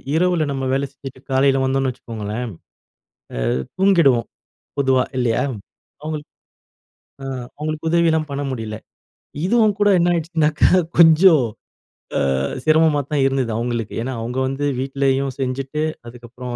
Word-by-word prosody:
இரவுல 175 -2 +2
நம்ம 135 -1 -3
வேலை 135 +1 0
செஞ்சுட்டு 135 -2 -10
காலையில 135 0 +3
வந்தோன்னு 135 0 +1
வச்சுக்கோங்களேன். 115 -2 -6 1.1
அ - - 0 0.2
தூங்கிடுவோம் 170 -11 +4 0.5
பொதுவா 130 -2 +3 0.2
இல்லையா? 115 -2 +1 0.6
அவுங்களுக்கு 155 -1 -5 0.9
அ - - -6 0.3
அவுங்களுக்கு 155 +1 -3
உதவிலாம் 160 -2 +2
பண்ண 140 +1 -3
முடியல. 110 -4 -5 0.7
இதுவும் 215 -1 +3
கூட 205 0 +4
என்னாயிடுச்சுனாக்கா 165 -3 +2 0.3
கொஞ்சம் 160 -3 +7 0.7
அ - - +1 0.4
சிரமமாத்தான் 150 -3 +2
இருந்தது 135 -3 0
அவுங்களுக்கு. 120 -2 -3
ஏன்னா 130 +2 -3
அவுங்க 125 +3 -3
வந்து 135 +2 -2 0.2
வீட்லேயும் 135 0 0
செஞ்சுட்டு, 135 +3 -2 0.2
அதுக்கப்புறம் 120 +1 -8
135 Hz, 110 wpm, -20 LUFS, 130-155 Hz, 1.1 s, கொஞ்சம்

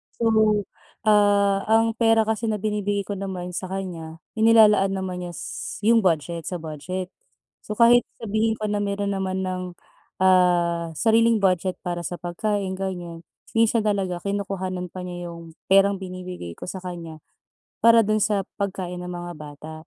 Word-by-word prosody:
So, 235 - -4 0.8
ah, 205 -2 +3
ang 225 +1 +4
pera 225 -1 +5
kasi 220 +1 -1
na 215 - +1
binibigay 205 -1 -1
ko 200 - -2
naman 185 -2 -5
sa - - -4
kanya, 165 -4 -6 0.2
inilalaan 215 -3 +6
naman 185 -2 -4
niya 175 - -8
s - - -6
yung 230 +2 +5
budget, 165 0 0
sa 180 - -3
budget. 175 +4 -5 0.6
So, 210 - -4
kahit 240 +2 +6 0.2
sabihin 220 0 0
ko 215 -1 -2
na 205 - 0
meron 200 0 -1
naman 190 0 -2
ng, 185 -1 -4 0.5
ah, 175 -2 +3
sariling 225 +3 +3
budget 185 0 +1
para 175 -1 -3
sa 175 - -3
pagkain, 190 +2 -2
ganyan. 175 -3 -5 0.3
Minsan 230 0 +4
talaga 195 -4 -1
kinukuhanan 190 -2 -3
pa 185 - -6
niya 175 -1 -6
yung 170 -1 -11 0.2
perang 195 +1 +5
binibigay 180 - -7
ko - - -11
sa 190 - -5
kanya 170 -3 -7 0.7
para 230 0 +7
dun 215 0 +1
sa 200 -3 0
pagkain 185 -3 -4
ng 180 - -6
mga 175 0 -6
bata. 150 +1 -10
190 Hz, 155 wpm, -24 LUFS, 175-210 Hz, 0.8 s, para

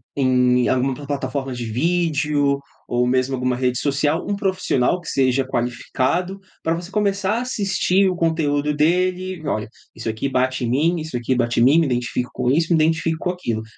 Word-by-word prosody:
em 125 -2 +3
alguma 130 +1 +1
plataforma 140 -1 -4
de 120 -1 -5
vídeo 145 +1 +1 0.3
ou 120 0 +1
mesmo 130 +1 +1
alguma 125 -1 -1
rede 125 -1 0
social, 145 +4 0
um 200 -1 -2
profissional 185 - 0
que 170 - -8
seja 135 0 +2
qualificado, 130 +9 -1 0.2
para 165 - +1
você 175 +1 -7
começar 200 +1 0
a - - -2
assistir 195 -5 +1
o 185 - -2
conteúdo 150 -3 0
dele 180 +4 +1
e: 155 -3 -9
"Olha, 110 -6 -1 0.3
isso - - -7
aqui 110 +5 -2
bate 130 0 0
em 115 - -1
mim, 160 +6 +1
isso 155 -5 -4
aqui 120 +2 -1
bate 120 -1 0
em - - +5
mim, 135 +6 +5
me 165 -3 +3
identifico 125 0 -2
com 125 - -1
isso, 160 +5 +2
me 170 - +4
identifico 160 0 +1
com 180 - +2
aquilo.". 115 -12 -3
145 Hz, 185 wpm, -21 LUFS, 125-175 Hz, 0.3 s, em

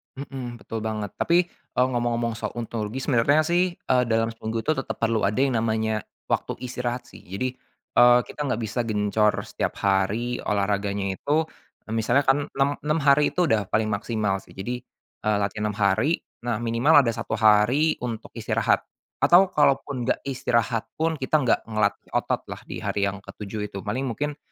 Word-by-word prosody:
Mhm. 130 -3 -7
Betul 115 - -5
banget. 110 -2 -3
Tapi, 170 +1 +3 0.4
eee, 125 +1 +4
ngomong-ngomong 120 -1 0
soal - - -4
ontologis, 115 +1 -4
sebenarnya 140 +5 +4
sih, 175 +3 +2
eee, 125 -5 +1
dalam 115 0 +1
seminggu 115 0 -4
itu 155 - +1
tetep 135 - -3
perlu 115 -1 +1
ada 105 - -2
yang 130 -4 +2
namanya 110 -1 0 0.3
waktu - - 0
istirahat, 125 0 -3
sih. - - -12
Jadi, 100 +7 -2 0.5
eee, 120 0 +8
kita - - -12
nggak 115 -3 -1
bisa 110 +3 -3
gencor 105 0 +2
setiap - - -3
hari 100 +5 +1
olahraganya 100 -1 0
itu. 155 +3 +1 0.4
Eee, 110 - -4
misalnya 120 +5 +2
kan 135 +2 +4
6, 135 +1 +1
6 150 +2 0
hari 140 +1 +5
itu 180 -1 +2
udah 105 -4 +2
paling 110 0 +1
maksimal, 100 -2 -1
sih. - - -18
Jadi, 120 +6 -4 0.5
eee, 105 -1 +3
latihan 105 +1 -2
6 105 - -5
hari, 100 - +2 0.3
nah, 120 -3 0
minimal 120 +6 +5
ada 115 - +1
1 110 - -4
hari 115 +9 +4
untuk 115 -3 -5
istirahat - - +1 0.4
atau 180 +2 +6
kalaupun 140 -5 +1
nggak - - 0
istirahat 115 -4 0
pun, 160 0 -1
kita 140 +3 +1
nggak 125 - +3
ngelatih 110 -2 -1
otot - - 0
lah - - -8
di - - -5
hari 100 - -2
yang 100 - -6
ke-7 105 +1 -6
itu. 100 - -7
Paling 125 +6 -2
mungkin 145 +5 -3
115 Hz, 175 wpm, -25 LUFS, 105-135 Hz, 0.5 s, eee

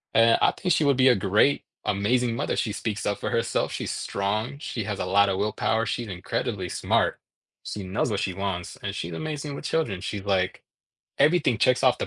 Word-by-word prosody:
Eh, 115 0 +6
I - - +5
think 180 - -2
she - - +2
would 140 -3 +3
be 130 0 +5
a 125 - +6
great, 100 +8 +2 0.2
amazing 115 +4 +1
mother; - - -1
she 110 - -1
speaks 105 0 -3
up 100 - -1
for - - -3
herself, 115 - 0
she's - - -3
strong, 110 +7 -2
she 115 -6 -4
has 100 -1 -4
a - - -1
lotta 100 +1 +3
willpower, 110 +3 0
she's 120 +1 -2
incredibly 90 -3 -3
smart. - - +1 0.4
She 105 - -5
knows 95 +5 -1
what 100 - 0
she 95 - -1
wants, 95 -2 -4
and 100 -1 -3
she's 85 -4 -4
amazing 150 - -4
with - - -8
children; 115 - -1
she's 100 0 -4
like, 95 -2 0 0.6
everything 145 -6 +3
checks 125 +3 +3
off 130 - +4
the - - -2
105 Hz, 205 wpm, -26 LUFS, 100-125 Hz, 0.6 s, Eh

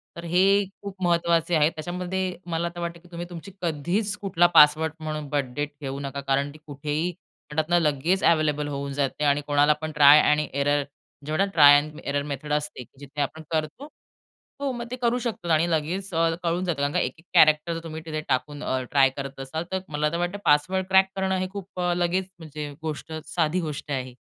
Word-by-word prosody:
तर 170 - -8
हे 180 +3 +3 0.4
खूप 200 -1 -7
महत्त्वाचे 170 -1 +2
आहेत. 155 +1 +4
त्याच्यामध्ये 180 +3 -3
मला 170 +1 -1
तर - - -6
वाटतं, 170 0 -4
की 175 - -20
तुम्ही 170 +1 -5
तुमची 175 +3 -9
कधीच 175 +6 -1
कुठला 175 -3 +3
पासवर्ड 150 +1 +6
म्हणून 155 -2 -4
बर्थ 145 -3 0
डेट 145 0 -2
ठेऊ 135 0 -4
नका. 140 0 -5
कारण 140 +1 0
ती - - -13
कुठेही, 150 +4 -2 0.4
म्हणतात 155 +2 -1
ना, 175 0 +4
लगेच 160 +5 +1
अवेलेबल 150 -3 +2
होऊन 140 -1 -4
जाते 140 +1 -1
आणि 145 0 +3
कोणाला 145 +1 +4
पण 155 0 -3
ट्राय 150 0 +8
आणि 150 0 +2
एरर 145 +1 +1 0.4
जेवढा 155 +6 +1
ट्राय 145 -2 +8
एंड 150 +1 -3
एरर 140 0 -1
मेथड 150 +1 -4
असते, 150 -3 -2 0.2
जिथे 145 +1 -6
आपण 160 +3 -3
करतो. 155 - -3 0.7
हो, 275 -2 0
मग 240 0 -5
ते - - -2
करू 240 +1 +2
शकतात 210 -8 -3
आणि 160 +2 +3
लगेच 175 +5 -2
अ, 165 0 +3
कळून 170 +2 0
जातं 160 -5 -2
कारण 145 +1 0
का - - +2
एक - - -1
एक 165 - -21
कॅरेक्टर 155 +2 +5
जर 165 - -4
तुम्ही 160 -1 -7
तिथे 155 -1 -3
टाकून, 145 +3 -1
अ, 130 0 -1
ट्राय 135 -2 +5
करत 135 -1 -6
असाल, 145 +5 -4
तर 190 - 0
मला 150 0 0
तर 170 - -2
वाटतं 175 +3 -2
पासवर्ड 185 +6 +2
क्रॅक 190 0 +5
करणं 190 0 0
हे 185 0 -1
खूप 195 -2 -8
अ, 175 0 +1
लगेच 180 +2 0
म्हणजे 150 -2 -7
गोष्ट, 160 0 -5
साधी 160 +2 0
गोष्ट 150 -2 -5
आहे. 130 -2 -3
155 Hz, 205 wpm, -25 LUFS, 145-175 Hz, 0.7 s, ट्राय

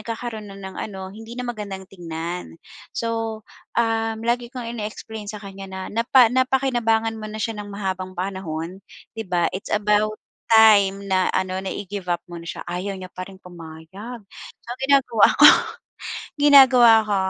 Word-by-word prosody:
nagkakaro'n 225 -1 -6
na 195 - -10
ng 190 -1 -9
ano, 190 -2 -6
hindi 225 +3 -10
na 250 - -4
magandang 200 -4 -5
tingnan. 170 -1 -6 0.4
So, 225 -1 -2 0.3
um, 225 -1 +1
lagi 240 0 0
kong 250 -2 -6
ine-explain 215 0 -6
sa 210 0 -6
kanya 195 0 -8
na 190 0 -7
napa 235 +2 +5
napakinabangan 240 -4 +1
mo 215 - -6
na 215 - -7
siya 220 0 -3
ng 205 - -8
mahabang 185 -2 -4
panahon, 180 -1 -4 0.4
'di 225 - -4
ba? 175 -1 +1
It's 190 - -6
about 210 +1 +2 0.3
time 205 -3 +6
na 185 -1 +2
ano, 185 0 -1
na 190 - -5
i-give 195 -2 -6
up 175 - -2
mo 175 -1 -8
na 170 - -12
siya. - - -5
Ayaw 185 +3 -3
niya 185 -1 -9
pa 185 0 -7
rin 195 - -12
pumayag. 180 +7 -10 0.4
So, - - -30
ang 250 - -9
ginagawa 270 -6 +4
ko - - +11 1.0
ginagawa 265 -5 +8
ko, 210 -1 0
210 Hz, 165 wpm, -22 LUFS, 190-225 Hz, 1.0 s, ko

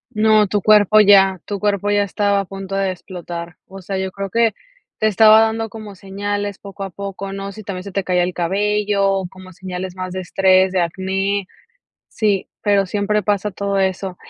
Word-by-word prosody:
No, 215 0 +4
tu 205 +1 -1
cuerpo 215 +1 +5
ya 195 -2 +5
tu 205 - -4
cuerpo 205 0 0
ya 205 0 +3
estaba 200 0 0
a - - -3
punto 195 0 -7
de 195 -1 0
explotar. 175 -1 -8
O 195 0 -11
sea, 190 +1 -5
yo 190 -1 -3
creo 195 0 -5
que 230 +3 +2 0.5
te 215 - +1
estaba 215 +1 +6
dando 225 0 0
como 215 -3 -9
señales 205 +1 -4
poco 200 0 -10
a 195 - -6
poco, 195 +1 -6
¿no? 195 0 -5
Si 215 +2 -10
también 190 -3 -6
se 200 0 -9
te 195 0 -2
caía 180 -1 +1
el 180 0 -2
cabello, 200 +1 0
como 185 0 -13
señales 185 0 -6
más 185 -1 -5
de 185 - -4
estrés, 185 +1 +3
de 185 -2 +1
acné. 190 +3 -2 0.6
Sí, 205 -4 -1
pero 200 -2 +2
siempre 210 +2 0
pasa 205 +1 -1
todo 200 +1 -2
eso. 190 -1 -1
195 Hz, 195 wpm, -19 LUFS, 185-205 Hz, 0.6 s, estaba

